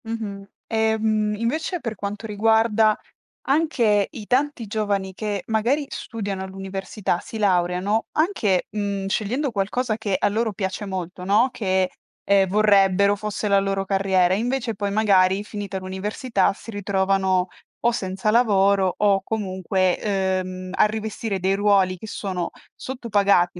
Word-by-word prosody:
Mh-mh. 220 Hz, -3 st, -5 dB, 0.2 s
Ehm, 220 Hz, -1 st, +1 dB
invece 310 Hz, -, -2 dB
per 230 Hz, -6 st, -4 dB
quanto 205 Hz, +2 st, -5 dB
riguarda 220 Hz, 0 st, +3 dB, 0.5 s
anche 245 Hz, -9 st, +2 dB
i 230 Hz, -9 st, -9 dB
tanti 260 Hz, -3 st, 0 dB
giovani 200 Hz, -2 st, -1 dB
che, 205 Hz, -1 st, -3 dB
magari 235 Hz, +7 st, +1 dB
studiano 200 Hz, -4 st, -5 dB
all'università, 190 Hz, 0 st, -3 dB
si 225 Hz, -, -8 dB
laureano 185 Hz, +1 st, +1 dB
anche, 255 Hz, -, +1 dB
mhmm, 200 Hz, -2 st, -3 dB
scegliendo 245 Hz, +8 st, -1 dB
qualcosa 215 Hz, +3 st, -1 dB
che 205 Hz, -3 st, -1 dB
a -, -, +1 dB
loro 220 Hz, +1 st, -1 dB
piace 190 Hz, +2 st, -3 dB
molto, 185 Hz, -1 st, -5 dB
no, 215 Hz, +7 st, +4 dB
che, 190 Hz, -4 st, 0 dB, 0.3 s
ehm, 195 Hz, -1 st, +4 dB
vorrebbero 200 Hz, 0 st, +4 dB
fosse 210 Hz, +1 st, -3 dB
la 200 Hz, 0 st, +5 dB
loro 195 Hz, 0 st, -1 dB
carriera; 190 Hz, -2 st, +2 dB
invece 235 Hz, +2 st, -1 dB
poi 200 Hz, 0 st, -2 dB
magari 195 Hz, -2 st, +3 dB
finita 205 Hz, -2 st, -5 dB
l'università, 195 Hz, +3 st, -1 dB
si 215 Hz, -, -13 dB
ritrovano 190 Hz, -2 st, +1 dB, 0.4 s
o 235 Hz, -, +5 dB
senza 195 Hz, -2 st, -1 dB
lavoro, 200 Hz, -5 st, +3 dB
o 200 Hz, -2 st, +3 dB
comunque, 185 Hz, -3 st, -1 dB
ehm, 185 Hz, -2 st, -2 dB
a 195 Hz, -, +4 dB
rivestire 215 Hz, -2 st, -3 dB
dei 190 Hz, +1 st, +2 dB
ruoli 195 Hz, -2 st, +3 dB
che 220 Hz, -, -9 dB
sono 185 Hz, -4 st, -3 dB, 0.2 s
sottopagati 200 Hz, -8 st, +1 dB
205 Hz, 135 wpm, -23 LUFS, 190-220 Hz, 0.5 s, la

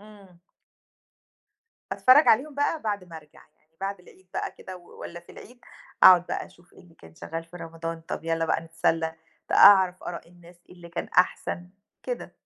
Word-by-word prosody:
إمم. 200 Hz, -4 st, -17 dB, 1.5 s
أتفرّج 260 Hz, +4 st, +5 dB
عليهم 275 Hz, +7 st, +3 dB
بقى 290 Hz, +3 st, -1 dB
بعد 205 Hz, -3 st, -3 dB
ما 170 Hz, -2 st, -11 dB
أرجع، 150 Hz, -2 st, -16 dB, 0.2 s
يعني 160 Hz, +1 st, -41 dB
بعد 195 Hz, -1 st, -4 dB
العيد 185 Hz, +1 st, -21 dB
بقى -, -, -3 dB
كده 185 Hz, -1 st, -9 dB
و 175 Hz, -1 st, -17 dB
والّا 170 Hz, 0 st, -8 dB
في 170 Hz, -, -17 dB
العيد، 245 Hz, +2 st, -15 dB, 0.4 s
أقعُد 180 Hz, -1 st, +8 dB
بقى -, -, -4 dB
أشوف 175 Hz, +2 st, -23 dB
إيه -, -, -18 dB
اللي 170 Hz, -2 st, -21 dB
كان 80 Hz, -, -17 dB
شغّال 165 Hz, -, -7 dB
في 165 Hz, +2 st, -13 dB
رمضان 165 Hz, 0 st, -7 dB
طَب 165 Hz, -, -7 dB
يالّا 165 Hz, 0 st, -1 dB
بقى -, -, 0 dB
نتسلّى 165 Hz, 0 st, -1 dB, 0.3 s
ت -, -, -4 dB
أعرف 190 Hz, -2 st, +6 dB
آراء 170 Hz, -1 st, -7 dB
الناس 175 Hz, 0 st, -18 dB
إيه -, -, -15 dB
اللي 175 Hz, -1 st, -13 dB
كان 170 Hz, -, -5 dB
أحسن 180 Hz, -1 st, 0 dB, 0.3 s
كده. -, -, -6 dB
175 Hz, 185 wpm, -25 LUFS, 165-195 Hz, 1.5 s, أقعُد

